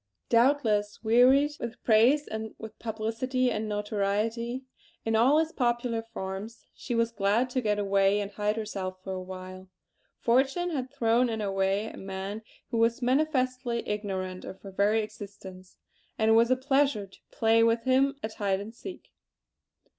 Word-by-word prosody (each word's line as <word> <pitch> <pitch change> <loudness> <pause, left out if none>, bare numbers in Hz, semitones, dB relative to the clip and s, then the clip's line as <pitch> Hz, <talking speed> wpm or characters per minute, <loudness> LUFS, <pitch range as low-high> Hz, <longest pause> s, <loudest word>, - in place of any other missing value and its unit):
Doubtless, 230 -5 +2
wearied 255 +6 +5
with 235 0 -6
praise 245 +7 +4
and 220 0 -5
with 220 -1 -10
publicity 235 +3 -1
and 215 -1 -2
notoriety 210 +4 -1 0.4
in 225 0 +1
all 255 +7 +5
its 320 0 +1
popular 240 -3 0
forms, 210 0 -7
she 245 - -4
was 230 0 +1
glad 225 +4 +1
to 255 - 0
get 210 -3 +1
away 200 0 +2
and 200 0 -4
hide 210 +1 -1
herself 195 -4 -4
for 190 - -4
a 185 - -4
while. 185 0 -9 0.5
Fortune 270 +9 +1
had 260 -5 -3
thrown 240 -2 +2
in 225 -1 -2
her 205 -2 -2
way 195 +2 +1
a - - -8
man 195 +2 -5 0.3
who 230 - 0
was 230 +2 +2
manifestly 255 -3 0
ignorant 190 -3 -3
of 190 - -8
her 195 - -9
very 210 +3 +2
existence; 195 -3 -10 0.4
and 220 0 +3
it - - +6
was 230 +1 +5
a 255 - +4
pleasure 270 -4 +1
to 195 - -19
play 225 0 +3
with 230 0 +2
him 270 +2 +3
at 220 0 -4
hide 195 -2 0
and 210 +3 -8
seek! 370 +10 -10
225 Hz, 165 wpm, -28 LUFS, 205-250 Hz, 0.5 s, it